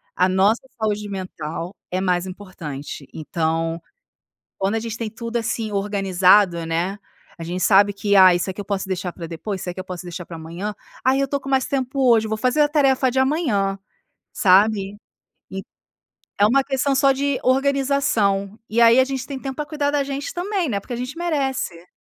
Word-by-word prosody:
a 180 - +3
nossa 195 +5 +3 0.2
saúde 210 -1 -1
mental 180 -2 -5 0.2
é 185 - 0
mais 180 -1 +1
importante. 165 -8 -8
Então, 165 +1 -2 0.8
quando 195 +3 0
a - - -1
gente 230 0 -5
tem 230 -1 -3
tudo 230 +1 -5
assim 225 -1 -2
organizado, 195 -3 +3
né, 175 +5 -1 0.4
a 165 - -6
gente 180 +2 -3
sabe 205 0 +5
que 200 0 +1
“Ah, 185 -2 +8
isso 175 +2 -1
aqui 190 +2 -7
eu - - -5
posso 195 -1 -2
deixar 185 -1 -3
pra 170 - -7
depois, 185 +4 -5
isso - - -6
aqui 175 - -9
eu - - -6
posso 185 -1 -7
deixar 175 0 -7
pra 165 - -8
amanhã.”. 170 +6 -5 0.3
“Ah, 260 +1 +4
eu 275 0 +1
estou 280 +1 -2
com 270 - -9
mais 265 -2 +2
tempo 265 -1 +1
hoje, 225 -1 +5
eu - - -6
vou 220 - -1
fazer 255 +6 +2
a 295 - +3
tarefa 270 -3 +3
de 260 - -1
amanhã.”, 245 - +1 0.5
sabe? 200 +1 +3 0.5
Então 190 0 -5 0.8
é 205 - +6
uma 275 +1 +4
questão 275 0 0
só 275 0 +5
de 280 0 -1
organização. 260 -7 +1
E 225 - 0
aí 235 +2 +7
a - - +7
gente 265 -1 -4
tem 275 -2 -5
tempo 270 0 -5
pra 300 - -3
cuidar 295 -1 -1
da 290 -1 +1
gente 275 +1 -4
também, 365 -2 -1
né. 200 -4 -1
Porque 245 - -8
a - - -1
gente 250 +6 -5
merece. 270 - -2
210 Hz, 200 wpm, -22 LUFS, 185-265 Hz, 0.8 s, Ah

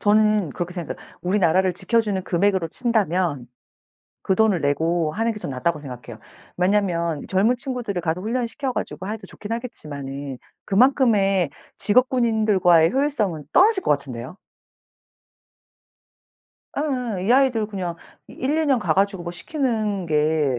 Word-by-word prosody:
저는 210 -4 +3
그렇게 175 +4 -5
생각해요. 170 -4 -5 0.3
우리나라를 185 -1 +2
지켜주는 195 +1 0
금액으로 190 -1 +1
친다면 180 - 0 0.8
그 190 - +1
돈을 215 -3 +3
내고 160 +3 0
하는 225 +2 0
게 210 - -7
저는 135 -8 -5
낫다고 155 +3 -1
생각해요. 125 -5 -9 0.4
왜냐하면 180 -4 +1
젊은 205 +6 +3
친구들을 245 -8 -3
가서 165 +1 -1
훈련을 235 +4 -1
시켜 265 +2 -3
가지고 190 - -4
해도 220 +1 -5
좋긴 210 - -9
하겠지만은 140 - -6 0.3
그만큼의 200 - +3 0.3
직업 250 +5 +3
군인들과의 210 -9 +3
효율성은 220 - 0
떨어질 390 +1 +5
것 - - +2
같은데요. 135 0 -3 2.4
예예. 250 -10 -2
이 235 - +4
아이들 250 -5 +3
그냥 185 -5 -4 0.3
1-2 300 +5 -1
년 270 -3 +3
가 215 - 0
가지고 195 -2 +1
뭐 175 - -5
시키는 215 - -2
게 150 -3 +1
195 Hz, 325 characters per minute, -23 LUFS, 165-230 Hz, 2.4 s, 떨어질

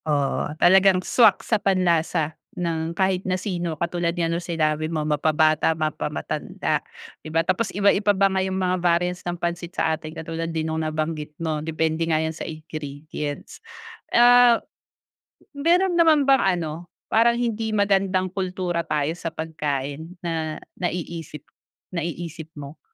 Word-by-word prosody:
Oo. 145 -3 0
Talagang 190 +1 +5
swak 225 -5 +4
sa 220 -3 +1
panlasa 170 -4 +1 0.2
ng 165 -2 -2
kahit 190 -1 +1
na 185 -1 0
sino 175 -5 -3
katulad 170 0 0
nga 170 - +1
ng 165 +1 -1
sinabi 155 -2 0
mo 155 -2 -1
mapa-bata, 155 +1 +3
mapa-matanda 155 -1 -2 0.4
di - - -7
ba, 165 +1 +1
tapos 185 +4 0
iba-iba 205 +1 +3
pa 195 0 +3
nga 190 -1 0
'yung 190 0 -2
mga 185 -1 +1
variants 175 +1 +1
ng 175 0 -3
pansit 170 0 -3
sa 160 - +2
atin 155 0 -9
katulad 165 0 -5
din 160 -1 -2
nung 160 0 -2
nabanggit 155 -1 -3
mo 155 -2 -2
depende 160 0 -1
nga 155 - +3
'yan 160 0 -1
sa - - -6
ingredients. 150 -2 -7 0.5
Ah, 245 0 +7 1.0
meron 350 +6 +2
naman 315 -3 +5
bang 270 0 +5 0.2
ano, 165 +1 -5 0.2
parang 235 +2 +4
hindi 225 -2 -1
magandang 195 -2 +2
kultura 180 -2 -2
tayo 150 0 0
sa 170 -1 -5
pagkain 155 +1 -4
na 160 -2 -2 0.2
naiisip 165 -4 -4 0.5
naiisip 165 -1 -5
mo? 145 +1 -9
170 Hz, 145 wpm, -23 LUFS, 155-190 Hz, 1.0 s, Ah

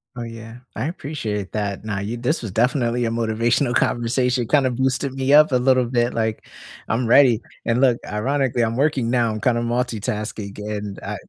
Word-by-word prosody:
Oh, 120 - -6
yeah, 115 0 -9 0.2
I 110 - -2
appreciate 115 - -4
that. 100 -2 -3
Now 105 -2 -2
you 110 +4 -4
this 125 +3 -1
was 105 - -5
definitely 120 +1 +1
a - - 0
motivational 115 +3 0
conversation, 120 +1 +1
kind 140 -1 +3
of 125 - -2
boosted 130 +1 0
me 135 +1 0
up 150 0 +7
a - - +2
little 130 0 +3
bit, 120 0 0
like, 110 -1 -2 0.4
"I'm 115 +1 0
ready." 120 -2 +5 0.2
And 120 +3 +1
look, 125 -3 +4
ironically, 130 +3 -1
I'm 115 0 0
working 135 -5 +1
now. 120 -2 +2
I'm 110 - -5
kinda 120 -2 +1
multitasking 110 -4 -3 0.2
and, 100 -1 -6
uh, - - -5
120 Hz, 185 wpm, -21 LUFS, 110-130 Hz, 0.4 s, up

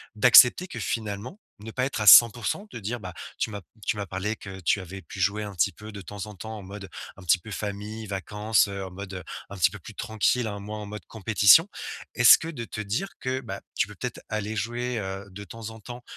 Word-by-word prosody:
d'accepter 125 - +7
que - - -7
finalement, 110 - -4 0.2
ne 110 +2 -8
pas 130 +3 -1
être 135 - -3
à 105 - -1
100%, 120 - +7
de - - -7
dire, 115 +4 -4
bah, 90 -4 -8 0.2
tu - - 0
m'as 100 -1 -6 0.2
tu 110 - 0
m'as 100 - -3
parlé 95 +4 -3
que 95 -3 -9
tu 90 +3 +1
avais 95 +2 -9
pu 90 +3 -10
jouer 100 +3 +1
un 100 -2 -7
petit 80 - +2
peu 105 0 -11
de 100 -1 -8
temps 100 +2 -7
en 105 - -10
temps 110 +5 -7
en - - -8
mode 95 0 -9 0.3
un 100 - -12
petit 90 +1 +4
peu 110 - -12
famille 105 +2 -5
vacances, 105 +2 +1
heu, 100 -1 -5
en 95 - -9
mode 95 -1 -7 0.3
un 100 - -8
petit 90 0 +4
peu 100 - -9
plus 105 +4 -12
tranquille 115 +2 0
hein, 100 -1 -5
moins 105 +2 -6
en 105 - -6
mode 105 +1 -8
compétition. 110 - +5 0.5
Est-ce 120 -2 +8
que 160 - -7
de 120 -8 -6
te 110 - -6
dire 110 - -2
que, 130 +1 -2
bah, 120 - -7
tu - - +1
peux - - -12
peut-être - - -5
aller 110 0 -3
jouer, 120 +3 -2
heu, 95 0 -5
de 100 +2 -8
temps 110 +1 -8
en 110 - -11
temps, 120 +3 -10
105 Hz, 240 wpm, -26 LUFS, 100-115 Hz, 0.5 s, Est-ce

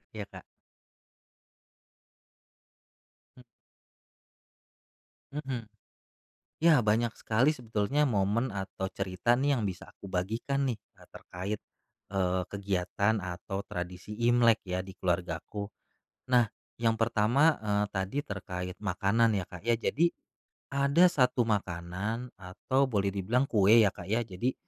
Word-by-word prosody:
Iya, 105 -2 -4
Kak. - - -10 3.0
M 125 - -14 1.9
Mmm. 135 -5 -4 0.9
Ya 160 -4 +5
banyak 110 +2 +2
sekali 120 +7 +2
sebetulnya 115 +2 0
momen 110 +3 +1
atau 95 -1 -4
cerita 95 +5 0
nih 140 +1 +2
yang 120 - -1
bisa 90 -2 -8
aku 100 - -11
bagikan 115 +10 -1
nih, 125 - 0
e - - -24
terkait, 100 +4 -5 0.5
eee, 95 -1 +1
kegiatan 100 +1 0
atau 90 +2 -5
tradisi 90 +2 -6
Imlek 120 -2 +5
ya 90 0 -1
di 95 0 -11
keluargaku. 90 +3 -2 0.7
Nah, 120 -1 +6 0.3
yang 115 -1 +1
pertama, 120 +8 +3
eee, 105 -1 +1
tadi 95 +7 -2
terkait 90 -2 -5
makanan 105 +4 +2
ya, 95 - -4
Kak, 90 -2 -10
ya, 115 -1 +2
jadi, 170 +8 +2 0.6
ada 140 +5 +4
1 125 -8 +3
makanan, 100 +3 -2
atau 95 +9 0
boleh 100 -4 +1
dibilang 110 +7 +1
kue 110 +1 +6
ya, 100 - +4
Kak, 90 - -10
ya, 110 +4 +1
jadi, 115 +5 -2
105 Hz, 120 wpm, -30 LUFS, 95-120 Hz, 3.0 s, Nah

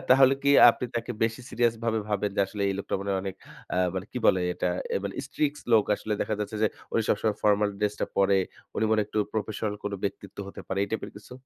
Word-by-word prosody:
তাহলে 135 +1 +7
কি 140 - +3 0.2
আপনি 125 - -4
তাকে 120 +1 -3
বেশি 115 +2 -2
সিরিয়াস 120 -1 +2
ভাবে 110 -1 +1
ভাবেন? 105 -1 0
যে - - +3
আসলে 100 +1 -5
এই 100 - 0
লোকটা 100 - -3
মানে 100 0 -3
হয় 95 - 0
অনেক 95 -1 -4 0.4
আ - - -1 0.2
মানে 95 +1 -3
কি - - -2
বলে 95 - +5
এটা? 90 - -1 0.2
অ্যা - - +1
মানে 100 - -4
strict 150 +1 -1
লোক 110 -2 +6
আসলে 105 - -4
দেখা 110 - 0
যাচ্ছে 105 +1 -3
যে - - +6 0.3
উনি 115 - +2
সবসময় 105 0 +1
ফরমাল 105 0 +4
ড্রেস 105 0 0
টা - - +1
পড়ে। 100 0 +4 0.4
উনি - - +1
মনে 110 -1 +4
হয় 105 - -1
একটু 110 - -3 0.2
প্রফেশনাল 110 -1 -2
কোন 105 - -2
ব্যক্তিত্ব 100 -1 -5
হতে - - -9
পারে। 95 - -2
এই - - -9
টাইপের 110 - -3
কিছু? 105 - -15
105 Hz, 240 wpm, -27 LUFS, 100-115 Hz, 0.4 s, তাহলে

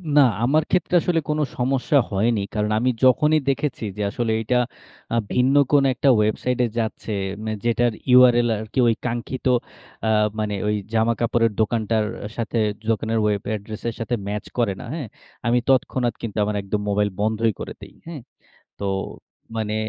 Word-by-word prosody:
না 145 - +8 0.2
আমার 150 +5 +3
ক্ষেত্রে 180 -1 0
আসলে 170 -1 +1
কোন 150 0 0 0.2
সমস্যা 135 +4 +1
হয়নি। 105 +2 +1
কারণ 105 0 0
আমি 125 +3 +2
যখনই 150 +4 +5
দেখেছি 135 -2 -1
যে - - -3
আসলে 115 0 -1
এইটা 125 +3 +1 0.6
আ - - +2 0.2
ভিন্ন 130 +2 +3 0.2
কোন 145 -1 +5
একটা 135 +2 +2
ওয়েবসাইটে 120 +4 +1
যাচ্ছে। 110 0 -3 0.3
মানে 110 0 -2
যেটার 120 0 +2 0.2
URL 120 -1 +6
আরকি 110 +4 -4
ওই 115 - +3
কাঙ্ক্ষিত 120 +2 -4 0.6
আ - - +2 0.3
মানে 105 -1 -1
ওই 105 - +1 0.2
জামা-কাপড়ের 115 0 +2
দোকানটার 110 0 +1 0.3
সাথে 115 0 -2 0.3
দোকানের 110 0 0
ওয়েব 105 -2 +1
এড্রেসের 110 +2 -5
সাথে 115 +2 -1
ম্যাচ 105 0 -3
করে 115 -5 +1
না - - -8
হ্যাঁ, 155 -7 -4 0.4
আমি 120 +1 +3
তৎক্ষণাৎ 125 -2 +2
কিন্তু 110 -3 -5
আমার 105 - -2
একদম 105 +1 -2
মোবাইল 105 0 +1
বন্ধই 110 +1 +1
করে - - -6
দেই - - -12
হ্যাঁ, 165 -5 -7 0.6
তো 100 - -5 0.7
মানে 110 -1 -2
115 Hz, 155 wpm, -22 LUFS, 110-125 Hz, 0.7 s, না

